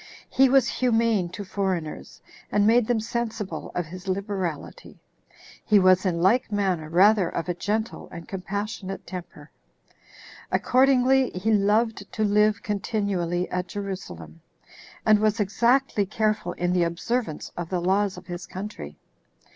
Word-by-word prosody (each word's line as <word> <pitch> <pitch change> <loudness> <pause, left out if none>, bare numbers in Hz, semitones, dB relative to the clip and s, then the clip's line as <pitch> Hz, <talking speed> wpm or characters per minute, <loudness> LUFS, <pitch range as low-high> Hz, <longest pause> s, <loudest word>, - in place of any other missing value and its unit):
He 270 0 +5
was 265 -2 +4
humane 230 -7 +1
to 185 +3 -7
foreigners, 185 -5 -4 0.3
and 205 0 +3
made 230 +1 +4
them 240 -2 +1
sensible 220 -7 -4
of 175 - -1
his 180 +4 -10
liberality. 190 - -4 0.7
He 210 - +4
was 185 0 +4
in 170 -2 0
like 220 +5 +3
manner 185 -6 -1
rather 190 +3 +4
of 165 - -4
a 175 - 0
gentle 215 +5 -3
and 170 -1 -10
compassionate 195 0 -5
temper. 170 -5 -9 1.0
Accordingly, 260 0 +3
he 195 +5 0
loved 210 +1 +1
to 215 - -1
live 210 0 +2
continually 195 -4 -1
at 180 0 -2
Jerusalem, 180 - -7 0.6
and 215 -1 +5
was 215 +1 +1
exactly 220 +1 +2
careful 215 -4 -1
in 175 0 -1
the 180 - +2
observance 170 +2 -2
of 175 -1 -5
the 180 - -1
laws 190 +2 +1
of - - -11
his 175 -1 -7
country. 190 - -7
200 Hz, 140 wpm, -25 LUFS, 180-220 Hz, 1.0 s, He